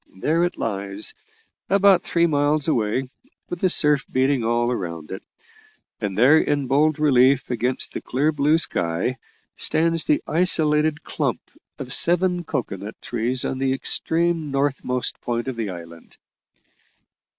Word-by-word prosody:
There 160 - 0
it 175 - -4
lies, 100 -1 -2 0.6
about 195 -2 +5
three 170 0 +1
miles 150 -1 +1
away, 125 -2 0 0.4
with 175 - -4
the 185 - +2
surf 150 -5 +2
beating 130 -1 +1
all 120 +1 +1
round 85 -7 -6
it; 95 - -6 0.8
and 100 -3 -4
there, 140 +8 +6
in 145 -2 0
bold 145 +4 +2
relief 135 -3 +3
against 125 +2 -1
the - - -5
clear 145 +5 0
blue 150 +1 +2
sky, 90 - -1 0.4
stands 165 0 +1
the 305 +1 +1
isolated 155 -3 +2
clump - - -2 0.4
of 125 -1 -6
seven 175 +4 +3
cocoa 130 - -3
nut 100 +4 -8
trees 120 +2 -2
on 130 - -3
the 135 -1 +1
extreme 165 +4 -1
northernmost 135 -2 -1
point 120 +1 -3
of 130 - -3
the 115 -3 -3
island." 85 -2 -11
135 Hz, 140 wpm, -22 LUFS, 120-155 Hz, 0.8 s, there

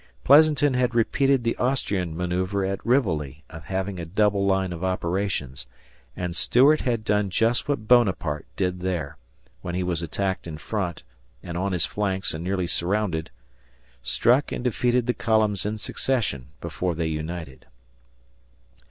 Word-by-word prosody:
Pleasanton 145 0 +5
had 125 -1 +1
repeated 135 +3 +2
the 115 - 0
Austrian 100 -10 -1
manoeuvre 90 +2 -1
at 95 0 -3
Rivoli 80 - 0
of 80 0 -10
having 95 0 -3
a - - -4
double 100 +2 +1
line 95 -2 +1
of 85 +1 -7
operations, 90 -7 -2 0.5
and 90 -1 -3
Stuart 140 +10 +4
had 115 -4 -1
done 105 -1 +1
just 115 +5 +1
what 110 -7 -1
Bonaparte 95 -11 +2
did 90 -1 -1
there, 90 -6 -3 0.4
when 85 0 -4
he 90 - -1
was 90 -2 -1
attacked 95 +3 -2
in 80 -2 -6
front 90 0 -3 0.4
and 85 -1 -6
on 95 +3 -1
his 90 -4 +1
flanks 95 -2 -1
and 80 +1 -5
nearly 95 0 -1
surrounded 85 -1 0 0.7
struck 120 - +2
and - - -4
defeated 125 0 +1
the 125 - +1
columns 110 -5 +1
in 110 +1 -2
succession 105 - -1
before 85 +1 -2
they 80 +1 -1
united. 80 -3 -5
95 Hz, 150 wpm, -25 LUFS, 85-115 Hz, 0.7 s, Pleasanton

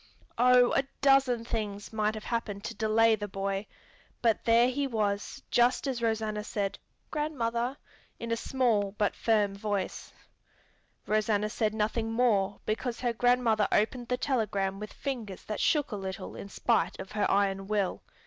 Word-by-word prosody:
Oh, 250 0 +6
a - - +4 0.2
dozen 270 -4 +4
things 210 -3 -4
might 215 0 0
have 215 - -7
happened 210 -4 -3
to 230 - -4
delay 225 +1 +3
the 205 -1 -5
boy, 195 +1 -3 0.6
but 225 -3 +2
there 235 +1 +5
he 275 +2 -1
was 215 +2 -2
just 245 +3 +3
as 260 -4 -2
Rosanna 220 -2 -1
said, 200 -2 -3 0.3
"Grandmother!" 255 -4 -1 0.4
in 230 0 -5
a - - +3
small 230 -5 +1
but 210 -1 0
firm 210 -3 +2
voice. 200 -1 -3 0.9
Rosanna 215 0 +1
said 215 -1 0
nothing 220 +1 -1
more 215 -4 +2
because 230 +2 -2
her 240 -2 0
grandmother 235 -3 +3
opened 240 +3 +1
the 250 - 0
telegram 205 -8 -1
with 210 0 -7
fingers 230 -9 -5
that 215 - -4
shook 295 -5 +2
a - - -2
little 190 -2 -6
in 200 - -8
spite 195 -5 +1
of 190 - -7
her 210 -1 0
iron 195 -1 +1
will. 205 -3 0
220 Hz, 160 wpm, -29 LUFS, 205-240 Hz, 0.9 s, Oh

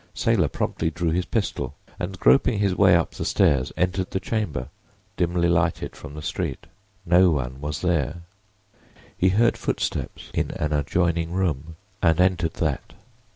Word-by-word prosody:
Saylor 110 -9 +2
promptly 80 - -1
drew 85 +1 -1
his 90 +1 -1
pistol, 110 -3 -2 0.2
and 95 +1 -4
groping 125 -4 +4
his 100 -2 +1
way 95 -2 +6
up 80 - +1
the - - -5
stairs 65 -3 +2
entered 90 +1 0
the 95 - -2
chamber, 90 - -3 0.5
dimly 85 0 +1
lighted 85 0 0
from 70 - -10
the 75 - -7
street. - - -3 0.4
No 90 +2 +5
one 65 -4 -2
was 75 0 -4
there. 85 -2 0 0.9
He 95 - +3
heard 115 +5 +3
footsteps - - -3
in - - 0
an 75 0 -1
adjoining 85 +3 0
room 80 -4 -1 0.3
and 80 -2 +3
entered 90 -3 +2
that. 80 -4 -2
85 Hz, 155 wpm, -24 LUFS, 75-95 Hz, 0.9 s, way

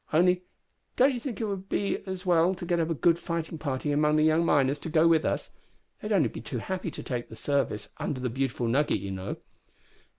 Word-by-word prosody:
Only 180 +3 +4 0.5
don't 265 +2 +5
you 245 - -3
think 235 -5 -5
it 225 - -1
would 195 -1 -4
be 200 - -1
as 190 0 -5
well 175 +1 +3
to 180 - -7
get 175 -1 +1
up 165 0 0
a 165 - 0
good 165 +5 +3
fighting 170 -2 -4
party 140 0 -2
among 150 +1 +3
the 155 - +4
young 160 +1 +4
miners 140 -3 +2
to 165 - -6
go 160 +1 +4
with 165 -2 +4
us? - - -2 0.5
They'd 210 - -4
only 165 - +3
be - - -8
too 120 +2 -5
happy 185 +8 -3
to - - -8
take 120 -2 -3
service 135 -5 -1
under 135 - -3
the 125 -2 -2
Beautiful 130 -2 -1
Nugget, 135 -1 +2
you 100 0 -5
know." 95 0 -4
160 Hz, 225 wpm, -28 LUFS, 135-180 Hz, 0.5 s, don't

